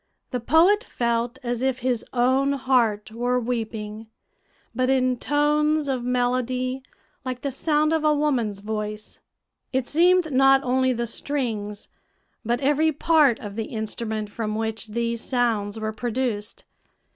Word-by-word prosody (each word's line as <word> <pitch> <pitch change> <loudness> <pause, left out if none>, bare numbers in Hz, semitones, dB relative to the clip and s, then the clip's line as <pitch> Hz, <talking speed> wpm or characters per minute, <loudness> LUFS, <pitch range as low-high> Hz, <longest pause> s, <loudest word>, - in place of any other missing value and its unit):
The 250 - -1
poet 335 - +4
felt 235 - -1
as 240 -1 -2
if 265 0 0
his 245 -3 +1
own 260 +3 +2
heart 240 -6 +1
were 245 +2 0
weeping, 225 -2 -4 0.7
but 255 +2 0
in 255 -2 +2
tones 300 +1 +1
of 260 -3 -1
melody 250 +1 0 0.4
like 255 -2 -4
the 280 - -2
sound 305 +3 +1
of 320 -1 +1
a 305 - +4
woman's 245 -9 0
voice. 210 0 -5 0.5
It 260 -1 -1
seemed 350 +1 +3
not 270 +1 +5
only 260 0 +2
the 235 -1 -1
strings, 225 -5 -3 0.6
but 240 +2 -1
every 295 +3 +3
part 300 -4 +3
of 205 -2 -7
the 225 0 -2
instrument 220 -1 -4
from 215 -1 -3
which 220 0 -3
these 230 +1 -2
sounds 225 -5 0
were 215 0 -3
produced. 230 -2 -3
250 Hz, 140 wpm, -24 LUFS, 225-270 Hz, 0.7 s, not